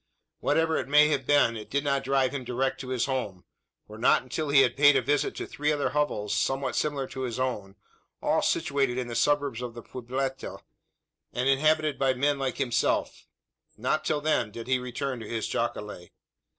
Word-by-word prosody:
Whatever 160 0 +1
it - - -3
may 150 +2 +6
have 135 -4 -1
been 145 -5 +4
it 110 -1 -8
did 140 +1 0
not 140 -1 0
drive 135 -1 +1
him 135 -2 -4
direct 125 +2 -2
to 130 - -8
his 130 -2 0
home: 115 -9 -3 0.4
for 110 +1 -11
not 120 - +4
until 145 +4 -3
he 140 -1 +6
had 130 - +2
paid 145 0 +6
a 135 - +4
visit 145 +4 0
to - - -4
three 150 +1 -1
other 145 -1 0
hovels 105 -9 -1
somewhat 135 +6 -1
similar 145 -3 -1
to 130 - -7
his 125 -1 -3
own 105 -7 -3 0.4
all - - +1
situated 135 -3 0
in 130 - -1
the - - -5
suburbs 140 -1 +1
of 120 -2 -6
the 120 - -8
pueblita, 130 +2 -4 0.8
and 125 +2 -1
inhabited 155 +2 +2
by 135 -1 +2
men 140 +2 +1
like 135 -1 -2
himself 120 -3 0 0.5
not - - 0
till 150 -1 0
then, 150 -7 +1
did 115 +2 -8
he 130 0 +1
return 125 +1 -4
to 110 - -8
his 115 -2 -2
jacale. 105 -6 -4
130 Hz, 195 wpm, -27 LUFS, 120-145 Hz, 0.8 s, may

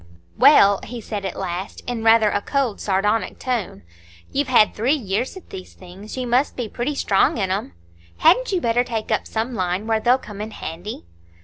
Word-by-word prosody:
"Well," 200 - +6
he 245 0 -7
said 205 -2 -5
at 190 - -4
last, 185 0 -5
in 240 -2 -4
rather 225 -2 +5
a 205 - 0
cold, 265 -3 -1
sardonic 210 +3 0
tone, 230 - -3 0.5
"you've 285 0 0
had 240 -5 +4
three 245 +7 +1
years 235 - -3
at 375 - -14
these 185 -1 -9
things,—you 200 +7 -8
must 245 +4 +1
be 245 -3 -3
pretty 245 +7 -3
strong 200 -4 +2
in 190 -3 -1
'em. 185 - -3 0.4
Hadn't 415 +10 +4
you 375 - +1
better 235 +1 +2
take 225 -3 -4
up - - 0
some 230 +3 -3
line 185 -1 -2
where 225 -1 +1
they'll 245 +3 +3
come 210 -5 -9
in 215 - -5
handy?" 175 - -7
220 Hz, 190 wpm, -21 LUFS, 195-245 Hz, 0.5 s, Well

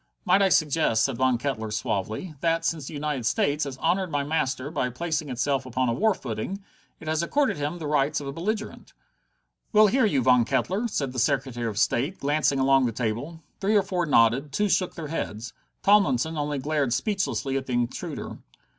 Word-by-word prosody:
"Might 200 - +4
I 195 - +4
suggest," 155 -8 +2
said 135 -4 -2
Von 130 -1 +2
Kettler 115 -4 -3
suavely, 110 - -3
"that, 165 +1 0
since 155 -5 -1
the - - -7
United 145 -3 -2
States 145 +6 +1
has 135 -2 -6
honored 180 +5 0
my 145 -2 -1
master 140 -2 -1
by 135 -5 -1
placing 155 +3 -3
itself 135 +2 0
upon 130 0 -1
a - - +1
war 215 - +2
footing, 130 - -5 0.4
it 160 - -11
has 160 0 +1
accorded 275 - +1
him 145 +4 -3
the 165 - -6
rights 150 0 +1
of 145 - -7
a 140 - -4
belligerent?" 210 +8 -4 0.8
"We'll 215 -1 +6
hear 235 +3 +3
you, 140 -10 +1
Mr. - - -2
Von 125 -2 +5
Kettler," 205 - 0
said 140 - -2
the 125 - -3
Secretary 130 -2 0
of 105 -2 -4
State, 140 - 0
glancing 145 0 +1
along 135 -1 +4
the - - -1
table. 120 +9 -4 0.2
Three 205 +2 +1
or 205 - +5
four 180 -3 -2
nodded, 130 +2 +3
two 205 +8 0
shook 185 -1 +1
their 155 -3 -6
heads: 115 -7 -4 0.3
Tomlinson 165 - +3
only 145 -1 -2
glared 140 -2 0
speechlessly 140 - -1
at 135 -1 -2
the 130 - -3
intruder. 120 -1 -3
145 Hz, 200 wpm, -26 LUFS, 130-170 Hz, 0.8 s, We'll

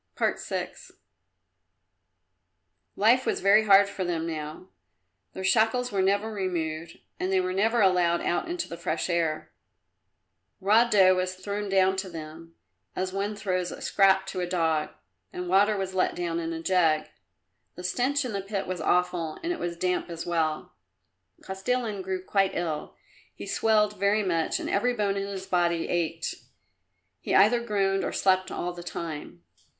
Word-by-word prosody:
VI - - -1 2.2
Life 235 +5 +4
was - - 0
very 210 +3 +5
hard 200 -1 +7
for 200 -1 -4
them 170 -2 -2
now. 155 +2 -6 0.6
Their 190 - -6
shackles 225 +5 +2
were 195 - +1
never 200 +3 +1
removed, 170 -4 -3 0.2
and 185 - -1
they 190 - +3
were 185 0 -1
never 225 +4 +2
allowed 180 -3 +3
out 175 - -1
into 350 0 -3
the 170 - -7
fresh 160 +3 -2
air. 165 -2 -1 1.1
Raw 215 +5 +5
dough 190 -4 +6
was 185 0 -1
thrown 200 +2 -4
down 190 0 +3
to 190 0 -3
them, 165 0 -10 0.4
as 185 0 -2
one 200 +2 -2
throws 185 -3 -2
a - - -8
scrap 190 -1 +3
to 190 -1 -5
a 180 - -1
dog, 165 -3 0 0.4
and 180 0 -5
water 200 +3 +3
was 190 -1 -3
let 185 - +1
down 170 -1 -2
in 165 0 -3
a 165 0 -5
jug. 165 -4 +2 0.7
The 180 - -9
stench 255 +9 0
in 240 - -4
the 200 - -2
pit 195 0 -3
was 180 -2 -4
awful 175 -1 0
and 345 +1 0
it - - -7
was 170 -1 -4
damp 180 +1 -1
as 165 -1 -6
well. 160 -3 -1 0.7
Kostilin 210 +2 -2
grew 185 0 -4
quite 195 0 +1
ill; 160 -3 -3 0.4
he - - -8
swelled 210 -2 +1
very 205 +2 +2
much 170 -4 0
and - - -4
every 245 +5 +1
bone 205 -3 0
in 200 0 -2
his 195 -1 -6
body 175 -3 +1
ached. 165 -2 -1 0.9
He - - -1
either 235 +3 +5
groaned 195 -3 0
or - - -2
slept 185 0 +2
all 175 0 -3
the 175 - -9
time. 160 - -7
185 Hz, 165 wpm, -27 LUFS, 170-200 Hz, 2.2 s, hard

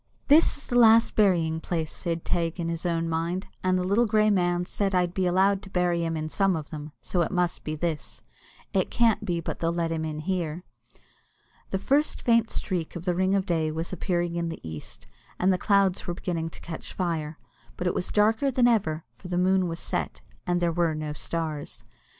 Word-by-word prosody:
"This 305 +2 +6
is 285 - -10
the 245 - +2
last 225 0 +6
burying 170 -6 +3
place," 160 -2 -3
said 165 -2 -3
Teig 170 0 -1
in 165 -1 -1
his 170 +1 -2
own 165 -1 0
mind; 165 +4 -2 0.2
"and 185 0 +2
the 180 - 0
little 205 +6 +2
grey 215 0 +3
man 175 -2 +1
said 195 +1 -1
I'd 180 -1 +1
be 185 -1 +1
allowed 190 +2 +3
to 195 - -12
bury 175 -2 +1
him 165 -1 -1
in 155 0 -3
some 195 +3 +1
of 155 -3 -6
them, 150 -1 -7
so 180 - 0
it 170 - +1
must 180 -2 -1
be 155 - -3
this; 160 -1 -4 0.5
it - - +1
can't 230 -3 +2
be 175 -5 -1
but 165 - -5
they'll 165 0 +1
let 170 -1 -1
him 160 -1 -2
in 155 -1 -3
here." 175 -1 -2 1.1
The 190 - 0
first 280 +10 +1
faint 230 -1 +3
streak 175 -4 -3
of 175 0 -6
the 180 - +2
ring 190 +2 +2
of 195 -1 +1
day 160 -3 0
was 165 +3 -3
appearing 175 -1 -1
in 170 -1 -1
the 165 - -6
east, 80 -1 -8 0.3
and 185 +1 +3
the 180 - -1
clouds 195 -2 +2
were 175 - -2
beginning 165 -3 -3
to - - -14
catch 165 -2 -7
fire, 160 -4 -2 0.4
but 180 - -3
it 180 - +1
was 180 - -2
darker 220 +6 +2
than 250 -2 +3
ever, 165 -9 +1
for 120 - -12
the 180 -1 -2
moon 185 0 +3
was 165 0 -4
set, - - -3 0.3
and 175 0 +2
there 175 -1 +1
were 165 -2 +1
no 155 -1 -4
stars. 155 -1 -4
175 Hz, 215 wpm, -26 LUFS, 165-190 Hz, 1.1 s, This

